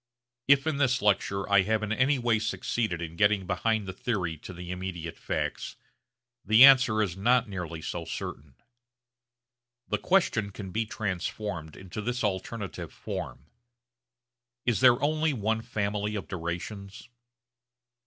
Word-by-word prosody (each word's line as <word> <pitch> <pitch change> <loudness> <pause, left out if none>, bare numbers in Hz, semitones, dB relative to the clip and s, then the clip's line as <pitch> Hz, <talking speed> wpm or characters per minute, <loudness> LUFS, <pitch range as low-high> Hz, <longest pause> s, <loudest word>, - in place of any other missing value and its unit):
If 140 0 +5
in 160 -3 0
this 130 -3 +2
lecture 100 -1 +1
I 100 -1 +5
have 110 +3 0
in 105 - -3
any 130 +5 +2
way 120 -3 +1
succeeded 105 -4 -2
in 80 0 -7
getting 100 -1 +3
behind 110 +1 0
the 95 - -4
theory 90 -5 -2
to - - -9
the 90 0 -7
immediate 90 -3 -5
facts, 75 -1 -3 0.7
the 110 +5 +7
answer 125 -6 +6
is 90 -5 -3
not 120 +5 +3
nearly 85 -5 -6
so - - -4
certain. 70 -2 -6 1.3
The - - 0
question 145 - +2
can 95 -1 -8
be 110 +3 -1
transformed 95 -5 -4
into 95 +3 -7
this 120 +3 -2
alternative 100 -2 -3
form, 65 - -6 1.2
Is 120 -3 +2
there 125 -1 +6
only 155 +1 +2
one 110 -1 -1
family 105 -2 -2
of 95 -6 -4
durations? 95 +3 -6
105 Hz, 140 wpm, -28 LUFS, 90-115 Hz, 1.3 s, the